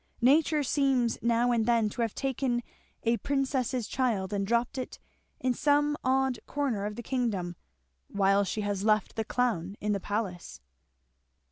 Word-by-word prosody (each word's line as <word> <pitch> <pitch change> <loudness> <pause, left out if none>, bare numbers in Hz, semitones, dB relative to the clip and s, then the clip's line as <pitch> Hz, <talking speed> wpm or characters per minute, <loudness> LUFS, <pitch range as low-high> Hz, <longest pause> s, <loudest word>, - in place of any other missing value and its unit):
Nature 300 +3 +4
seems 265 -4 +1
now 235 +1 +2
and 230 -2 +1
then 230 -2 +3
to 210 - -4
have 230 -2 -1
taken 260 -3 -1 0.4
a 235 0 +2
princess's 265 -4 -1
child 220 -8 -1
and 200 -1 -1
dropped 235 +3 0
it 255 - -5 0.4
in 255 -1 +1
some 290 +3 +2
odd 260 -1 +1
corner 250 -9 -1
of 210 - -6
the 240 - -7
kingdom, 210 -9 -1 0.5
while 200 0 +3
she 200 +3 -2
has 205 -1 -2
left 215 -2 +2
the 220 - -1
clown 210 -6 -1
in 210 - -1
the 200 - 0
palace." 185 - -4
235 Hz, 155 wpm, -29 LUFS, 205-260 Hz, 0.5 s, Nature